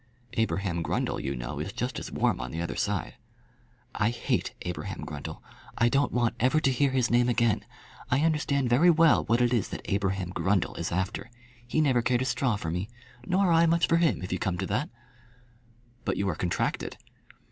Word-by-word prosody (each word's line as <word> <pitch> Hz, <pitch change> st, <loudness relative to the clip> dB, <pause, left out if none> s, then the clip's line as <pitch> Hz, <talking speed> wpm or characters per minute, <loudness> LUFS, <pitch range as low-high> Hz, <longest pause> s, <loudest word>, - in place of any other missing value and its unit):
"Abraham 100 Hz, -6 st, 0 dB
Grundle, -, -, -1 dB
you 70 Hz, -, -3 dB
know, 60 Hz, +4 st, -5 dB
is 80 Hz, +6 st, -3 dB
just 125 Hz, +2 st, -3 dB
as -, -, -7 dB
warm -, -, +1 dB
on 65 Hz, -, -4 dB
the 80 Hz, -, -5 dB
other 85 Hz, -, -3 dB
side." -, -, -2 dB, 0.8 s
"I 105 Hz, -, +1 dB
hate 120 Hz, -, -1 dB
Abraham 90 Hz, -1 st, -5 dB
Grundle. -, -, -7 dB, 0.3 s
I 115 Hz, -, +4 dB
don't 140 Hz, +3 st, +2 dB
want 120 Hz, -2 st, +1 dB
ever 130 Hz, +6 st, +3 dB
to 135 Hz, -, +2 dB
hear 140 Hz, +2 st, +2 dB
his 130 Hz, -3 st, +1 dB
name 120 Hz, +1 st, +4 dB
again. 115 Hz, -3 st, +2 dB, 0.5 s
I 135 Hz, +3 st, +2 dB
understand 150 Hz, -4 st, +1 dB
very 130 Hz, +9 st, +5 dB
well 165 Hz, -2 st, +5 dB
what 115 Hz, +1 st, +2 dB
it 120 Hz, 0 st, +3 dB
is 115 Hz, -5 st, +1 dB
that -, -, -6 dB
Abraham 95 Hz, -2 st, -1 dB
Grundle 95 Hz, -1 st, 0 dB
is 85 Hz, -, -3 dB
after. 95 Hz, +6 st, -2 dB, 0.4 s
He 155 Hz, +6 st, +1 dB
never 130 Hz, -5 st, +3 dB
cared 125 Hz, +1 st, +1 dB
a -, -, -3 dB
straw 125 Hz, -2 st, +1 dB
for 80 Hz, -6 st, -4 dB
me; 90 Hz, +5 st, -3 dB, 0.4 s
nor 185 Hz, 0 st, +3 dB
I 165 Hz, +1 st, +5 dB
much 170 Hz, +1 st, +3 dB
for 165 Hz, -, +3 dB
him, 165 Hz, -, +2 dB
if 90 Hz, -, -3 dB
you 95 Hz, -, -1 dB
come 95 Hz, -1 st, -1 dB
to 95 Hz, -, -2 dB
that." 105 Hz, +10 st, -1 dB, 1.1 s
"But -, -, -1 dB
you 100 Hz, -, 0 dB
are 85 Hz, -, -1 dB
contracted." 90 Hz, +1 st, -2 dB
120 Hz, 200 wpm, -28 LUFS, 95-135 Hz, 1.1 s, very